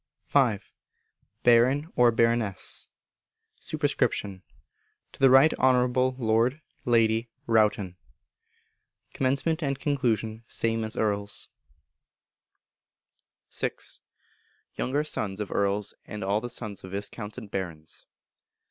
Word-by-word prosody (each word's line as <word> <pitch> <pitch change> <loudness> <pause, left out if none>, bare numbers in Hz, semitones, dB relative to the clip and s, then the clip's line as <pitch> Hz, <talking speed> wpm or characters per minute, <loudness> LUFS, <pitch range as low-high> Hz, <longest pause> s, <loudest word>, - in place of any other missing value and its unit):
v. 125 -7 +3 0.9
Baron 130 +7 +4
or 125 -1 +6
Baroness. 115 -4 +1 0.7
Sup. 155 - -5
To 125 -7 +1 0.9
the 135 - +6
Right 135 +4 +7
Honourable 125 0 +3
Lord 115 +3 +1 0.3
(Lady) 115 -1 +2 0.2
Rowton. 105 -5 +2 1.2
Comm. 140 +5 0
and 140 -3 -1
Con. 115 -6 -1
same 115 0 0
as 110 +1 -4
Earl's. 100 -1 -1 2.0
vi. - - -1 1.1
_Younger 145 +4 0
Sons 105 -9 -3
of 105 - -4
Earls, 100 0 0
and 105 -1 -6
all 100 +3 +1
the 120 - -5
Sons 110 -4 -5
of 95 0 -9
Viscounts 105 +2 -4
and 110 -5 -9
Barons. 85 -5 -6
115 Hz, 100 wpm, -27 LUFS, 105-130 Hz, 2.0 s, Right